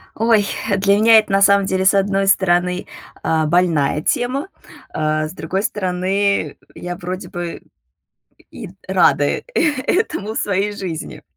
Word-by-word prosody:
Ой, 225 -2 +2 0.3
для 200 0 +3
меня 225 +2 +6
это, 215 - -4
на 195 0 +2
самом 200 0 +5
деле, 190 0 -1
с 190 - +5
одной 195 0 +1
стороны, 180 -1 +1 0.4
а, 160 -1 +1
больная 155 -3 +1
тема, 255 - -1 0.4
а 155 0 -1
с 155 - -10
другой 190 +3 -3
стороны, 190 -3 -1 0.2
я 175 0 -6
вроде 185 +1 -6
бы 175 -1 -6 0.9
и - - -9
т 180 - -16 0.2
рада, 175 -5 +3
э, - - -1 0.4
этому 220 - -1
в - - -2
своей 200 +1 -1
жизни. 180 -6 -6
190 Hz, 150 wpm, -19 LUFS, 175-200 Hz, 0.9 s, меня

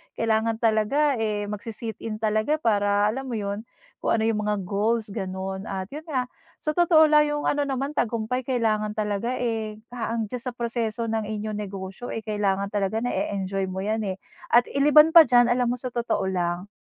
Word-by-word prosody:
kailangan 225 0 +1
talaga 230 +5 +2
eh, 210 -2 -1
magsi 210 +2 -5
sit-in 225 -1 -5
talaga 215 +7 +2
para 205 -7 +2
alam 265 +4 -5
mo 245 - -3
yun, 205 +1 -4 0.3
kung - - +1
ano 220 - 0
yung 215 -1 0
mga 210 -2 0
goals 210 +3 0
ganun. 190 0 -4
At 190 0 -5
yun 305 +3 -8
nga, 255 -5 -2 0.3
sa 305 - +1
totoo 330 -1 +5
lang 300 0 +6
yung 295 0 -2
ano 290 -1 +1
naman 270 +1 -2
tagumpay 240 -1 -1
kailangan 215 -4 0
talaga 215 +3 -1
eh, 225 -3 -2 0.2
ah, 230 -2 -3
ang 230 - 0
diyan 250 - -3
sa 245 0 -5
proseso 230 -1 -2
ng 220 -2 -1
inyong 215 0 -4
negosyo 195 +3 -6
eh, 225 - -4
kailangan 200 -2 -1
talaga 205 +2 -1
nae-enjoy 195 -5 -2
mo 190 +1 -4
yan 215 +2 0
eh. 190 - -2 0.4
At 240 - +4
iliban 300 +3 +6
pa 325 -1 +9
diyan 245 -1 +5
alam 245 0 +2
mo 245 - 0
sa 250 0 -6
totoo 235 -4 -1
lang, 180 +2 -2
220 Hz, 190 wpm, -25 LUFS, 205-245 Hz, 0.4 s, pa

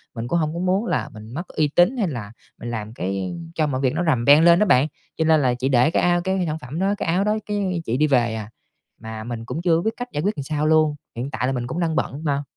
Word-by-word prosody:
mình 115 0 -4
cũng 170 - +1
hông 155 -1 -1
có 170 - -4
muốn 185 +4 +1
là - - -1
mình 110 +1 -11
mất 170 +6 -5
uy 155 - 0
tín 180 +10 +4
hay 215 -6 +1
là 115 -9 -5 0.3
mình 120 - -6
làm 110 -1 -5
cái 95 -1 -3 0.2
cho 155 -2 +1
mọi 130 -2 -2
việc 130 0 +1
nó 175 - -1
rầm 130 -7 +1
beng 145 +3 +7
lên 170 0 +6
đó 210 - +4
bạn. 145 -6 +4 0.3
Cho 160 - +1
nên 160 -1 +4
là 125 -3 +2
chị 125 +2 -2
để 130 +4 +4
cái - - +1
ao 175 0 +3
cái 190 0 0
sản 155 0 -2
phẩm 145 +3 -6
đó, 195 +2 +1
cái - - -3
áo 175 +4 +2
đó, 210 +1 +1
cái 195 -4 -1
chị 115 +2 -1
đi 150 +2 +3
về 120 -5 +2
à. 110 -1 -6 0.5
Mà 110 -1 -7
mình 115 -1 -6
cũng 160 - -4
chưa 170 -2 +3
có 170 - 0
biết 220 - 0
cách 245 - -4
giải 150 - -2
quyết 205 +3 0
làm 140 - -4
sao 150 +1 -2
luôn, 155 -1 +3 0.2
hiện 125 +4 -4
tại 120 +2 -1
là 135 - 0
mình 120 -2 -3
cũng 145 +8 -4
đang 165 -2 0
bận 145 +1 -2
mà. 145 -2 0
150 Hz, 300 wpm, -22 LUFS, 120-175 Hz, 0.5 s, beng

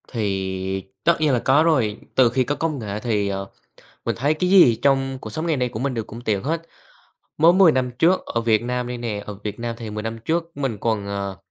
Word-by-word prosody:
Thì 95 -3 -2 0.2
tất 170 - +4
nhiên 150 -3 +3
là 125 - +2
có 140 +6 +4
rồi. 125 -11 +2 0.2
Từ 130 -2 +5
khi 130 +2 +1
có 145 +4 -2
công 155 -3 -2
nghệ 105 -2 -4
thì, 105 -3 0
ờ, 95 0 -4 0.6
mình - - 0
thấy 140 +5 +1
cái 180 +4 -1
gì 180 -12 +7
trong 135 +1 +1
cuộc - - -7
sống 160 +1 -4
ngày 160 -3 +1
nay 125 -1 0
của 110 - -6
mình 135 +1 -1
đều 115 -2 -2
cũng 115 +2 -10
tiện 105 -5 -1
hết. 160 +4 -1 0.8
Mới 165 +3 +6
10 185 -3 +6
năm 130 -2 0
trước 180 +3 +3
ở 115 - -2
Việt 110 -2 +2
Nam 125 0 -2
đây 125 0 -4
nè, 110 -4 -4
ở 105 - -6
Việt 105 0 -5
Nam 115 0 -3
thì 115 -2 -6
10 105 0 -5
năm 115 0 -4
trước 165 +2 -1
mình 135 -6 -2
còn, 110 -1 -1
ờ, 100 -1 -4
120 Hz, 245 wpm, -22 LUFS, 105-145 Hz, 0.8 s, gì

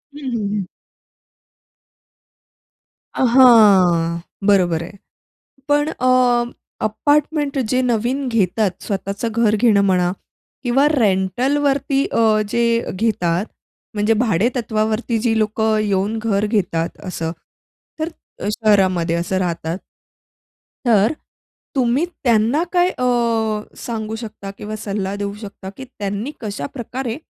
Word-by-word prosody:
हं, - - -8 0.2
हं, 210 -3 -1
हं. 195 -3 -2 2.5
अ, - - 0
हां. 190 -9 +6 0.3
बरोबर 180 -5 +3
आहे. 200 +4 -11 0.7
पण 290 +1 +2
अ, 250 -3 +3 0.4
अपार्टमेंट 290 +4 0
जे 255 +2 +2
नवीन 250 +3 0
घेतात, 210 -2 +1
स्वतःचं 200 +2 -3 0.2
घर 210 0 +3
घेणं 210 -3 +4
म्हणा 180 -2 +2 0.5
किंवा 265 +3 +3
रेंटलवरती 270 - +1
अ, 220 -2 +3
जे 235 +2 +1 0.3
घेतात 185 -2 0 0.5
म्हणजे 210 +2 +2
भाडेतत्वावरती 220 +1 0
जी 225 0 +1
लोकं 220 0 +1
येऊन 205 +1 0
घर 215 -2 0
घेतात 175 -6 -1
असं, 165 -3 -3 0.7
तर 315 +1 -1 0.4
शहरामध्ये 190 -6 +2
असं 175 +2 -1
राहतात. 170 -1 -2 1.1
तर 220 +3 +4 0.6
तुम्ही 255 +5 +2 0.2
त्यांना 235 +6 +3
काय 360 0 +3
अ, 250 - 0 0.7
सांगू 220 -2 -4
शकता 215 -3 -8
किंवा 215 +1 -5
सल्ला 200 -1 -2
देऊ 200 0 -4
शकता 200 -2 -8
की 265 - -8
त्यांनी 210 0 -5
कशाप्रकारे, 225 - -5
215 Hz, 105 wpm, -19 LUFS, 195-245 Hz, 2.5 s, हां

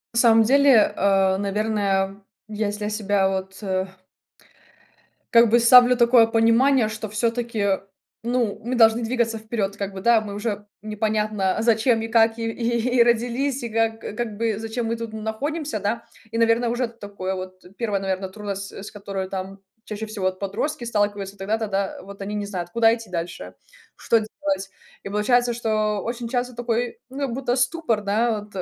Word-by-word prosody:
На - - 0
самом 225 -2 +6
деле, 270 -2 +5
э, 195 -1 +3
наверное, 200 -1 -1 0.3
если 210 -1 -3
я - - -1
себя 205 -2 +1
вот, 190 +1 -4
э 190 -1 -1 1.5
как 235 -1 +6
бы 235 +2 +5
ставлю 245 +1 +7
такое 235 -1 +6
понимание, 230 +2 +3
что 220 0 -6
всё-таки, 230 -2 0 0.4
ну, 235 -3 -1
мы 245 +2 -2
должны 225 0 +5
двигаться 230 -1 0
вперед 215 -3 -3
как 200 -1 -4
бы, 190 - -7
да, 235 0 +4
мы 205 -2 -7
уже 205 -1 -3 0.2
непонятно, 215 -2 -1
зачем 225 0 +3
и 225 - -3
как 225 0 +3
и 225 0 -2
и 235 +1 -1
и - - +9
родились, 245 +3 0
и 235 - -3
как 225 0 0
как 220 -1 -5
бы 225 -2 0
зачем 225 +1 -3
мы 230 - -1
тут 230 -1 -6
н 220 -1 -6
находимся, 280 +3 -3
да, 225 +4 -2 0.3
и, 230 - -3
наверно, 230 +1 +3
уже 240 +1 0
такое 200 -4 -6
вот, 185 0 -8
1, 210 -5 -1
наверно, 190 0 -2
трудность, 200 0 -6
э, - - -8
с - - -8
которой 195 -2 -5
там 195 +1 -6 0.3
чаще 220 +1 -5
всего 210 -3 -4
вот 185 0 -1
подростки 235 +7 -3
сталкиваются 205 -3 -1
тогда-то, 215 +3 -2
да: 195 -1 -2
вот 200 0 -11
они 200 +1 -4
не 205 -1 -2
знают, 180 -4 -5
куда 225 +1 +4
идти 230 -3 -11
дальше, 170 0 -5 0.4
что 230 - +2
делать. 255 -1 -3 0.3
И - - -6
получается, 240 +4 +2
что 215 -3 0
очень 235 0 -4
часто 250 0 -2
такой, 240 0 -2
ну, 275 +1 -3
будто 245 0 -1
ступор, 255 -4 0
да, 215 +2 +1
вот 210 0 -15
220 Hz, 175 wpm, -23 LUFS, 200-235 Hz, 1.5 s, и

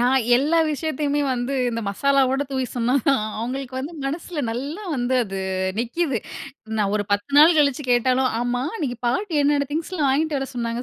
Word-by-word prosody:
நான் 255 +2 +3 0.2
எல்லா 305 +6 +2
விஷயத்தையுமே 295 -1 -1
வந்து 245 +3 -2 0.2
இந்த 230 0 -3
மசாலாவோட 270 +5 +2
தூவி 260 -1 -1
சொன்னாதான், 250 0 +2
அவுங்களுக்கு 255 +3 -4
வந்து 285 +6 -5
மனசுல 310 +2 -3
நல்லா 280 - -4
வந்து 245 +1 0
அது 195 -1 -5 0.4
நிக்கிது. 250 +2 -1 0.6
நான் 200 -1 +1
ஒரு 205 - -1
10 205 +7 -1
நாள் 315 +2 +7
கழிச்சு 280 -1 +2
கேட்டாலும், 255 +1 +3
"ஆமா, 245 +1 -1
அன்னைக்கு 255 - -3
பாட்டி 320 - 0
என்னென்ன 285 -1 +2
திங்ஸ்லாம் 315 -2 -1
வாங்கிட்டு 300 +1 +1
வர 270 0 -4
சொன்னாங்க 235 0 -2
270 Hz, 160 wpm, -22 LUFS, 245-295 Hz, 0.6 s, நாள்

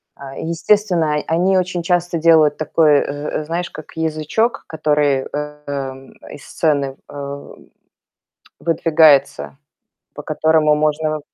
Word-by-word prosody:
А, 135 -1 -10
и - - -5
естественно, 170 -2 +1
о 150 - -2
они 180 +4 +2
очень 180 -1 -2
часто 175 -1 0
делают 160 -2 +4
такой, 155 -1 +3
э - - -1 0.4
э, 150 - -8
знаешь, 170 +2 -3
как 155 - -11
язычок, 160 +9 -1
который, 150 -3 0
эм, 145 -3 -6 0.2
из 145 - -11
сцены, 140 -4 -1
э, 140 0 -7 1.1
выдвигается, 155 -5 +2 0.6
по - - -8
которому 155 -1 +2
можно 155 +1 0
155 Hz, 120 wpm, -18 LUFS, 145-165 Hz, 1.1 s, делают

